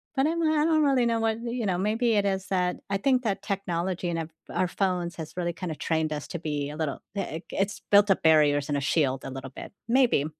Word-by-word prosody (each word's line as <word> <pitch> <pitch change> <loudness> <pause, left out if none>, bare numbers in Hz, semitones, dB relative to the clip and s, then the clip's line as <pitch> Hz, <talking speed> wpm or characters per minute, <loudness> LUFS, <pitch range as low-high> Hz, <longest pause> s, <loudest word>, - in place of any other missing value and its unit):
but 270 +2 +3
I'm 335 +1 0
I 310 -1 +3
don't 315 -2 +3
really 270 -4 +3
know 230 -1 +1
what, 225 0 0
you 235 -1 -2
know, 185 -2 +1
maybe 225 +4 +1
it 205 -1 +2
is 190 -1 -1
that, 180 -2 0
I 200 - +2
think 255 +4 +2
that 200 -4 -1
technology 185 -3 -2
and 165 - -1
our 160 -1 -4 0.2
our 185 - +1
phones 180 -2 -1
has 160 -2 -7
really 175 -1 -1
kind 180 -1 -5
of 155 - -7
trained 160 -1 0
us 150 -1 -5
to 170 - -4
be 150 -3 -3
a 150 - -7
little 155 -3 -2 0.2
big 170 -4 -4
it's 195 +2 -1
built 205 0 +6
up 195 - +1
barriers 150 -3 +4
and 145 - +1
a 140 - -1
shield 135 -2 +1
a - - -5
little 135 0 -7
bit, - - -9 0.2
maybe. 240 - +3
185 Hz, 250 wpm, -27 LUFS, 160-225 Hz, 0.2 s, built